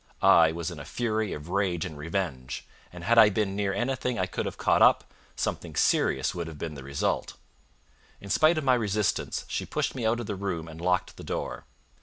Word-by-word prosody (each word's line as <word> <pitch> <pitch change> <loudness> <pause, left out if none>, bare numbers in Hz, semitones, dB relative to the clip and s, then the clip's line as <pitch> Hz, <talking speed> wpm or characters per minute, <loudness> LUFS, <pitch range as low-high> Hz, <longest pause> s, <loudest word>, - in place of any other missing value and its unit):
I 80 -1 +7
was 85 +1 -4
in 85 - -8
a - - -7
fury 110 - -1
of 75 +3 -7
rage 95 -3 0
and 85 -4 -7
revenge, 75 -5 -4 0.3
and 90 -1 -10
had 115 +4 +5
I 110 -2 +9
been 100 -1 -1
near 100 -1 0
anything 125 +3 -1
I 95 - +1
could 90 - -3
have - - -6
caught - - +2
up, - - +6 0.3
something - - -3
serious - - +2
would 85 -2 -4
have 80 -2 -8
been 80 +1 -5
the 70 -2 -9
result. 70 +1 -2 0.8
In 100 - -8
spite 155 +1 +4
of 155 - -1
my 130 -2 +4
resistance, 105 -4 0
she - - -2
pushed - - -2
me 125 - -5
out 115 +2 +1
of 120 - -4
the 105 - -3
room 95 -5 -3
and 80 0 -10
locked 90 +1 0
the - - -9
door. - - -4
95 Hz, 215 wpm, -27 LUFS, 80-110 Hz, 0.8 s, I